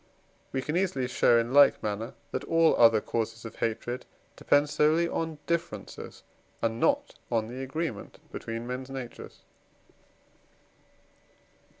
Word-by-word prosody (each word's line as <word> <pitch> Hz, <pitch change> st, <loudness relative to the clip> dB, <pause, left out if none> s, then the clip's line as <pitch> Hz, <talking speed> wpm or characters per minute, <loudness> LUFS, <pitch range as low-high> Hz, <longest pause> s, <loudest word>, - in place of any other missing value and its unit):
We 135 Hz, -1 st, -2 dB
can 150 Hz, +4 st, -2 dB
easily 175 Hz, -9 st, 0 dB
show 120 Hz, -1 st, +4 dB
in 115 Hz, +2 st, 0 dB
like 145 Hz, 0 st, +6 dB
manner, 105 Hz, +2 st, -3 dB, 0.2 s
that -, -, -3 dB
all 165 Hz, 0 st, +4 dB
other 115 Hz, -2 st, +6 dB
causes 115 Hz, 0 st, -3 dB
of 115 Hz, -, -8 dB
hatred 120 Hz, +2 st, -2 dB, 0.3 s
depend 145 Hz, +1 st, +3 dB
solely 155 Hz, +3 st, +3 dB
on 160 Hz, -2 st, -3 dB
differences, 170 Hz, 0 st, -4 dB, 0.4 s
and 115 Hz, 0 st, -1 dB
not 285 Hz, -, +1 dB
on 110 Hz, -1 st, 0 dB
the 130 Hz, +2 st, -6 dB
agreement 135 Hz, -4 st, -4 dB
between 115 Hz, +1 st, -5 dB
men's 125 Hz, +2 st, -5 dB
natures. 130 Hz, -3 st, -8 dB
130 Hz, 125 wpm, -28 LUFS, 115-155 Hz, 0.4 s, like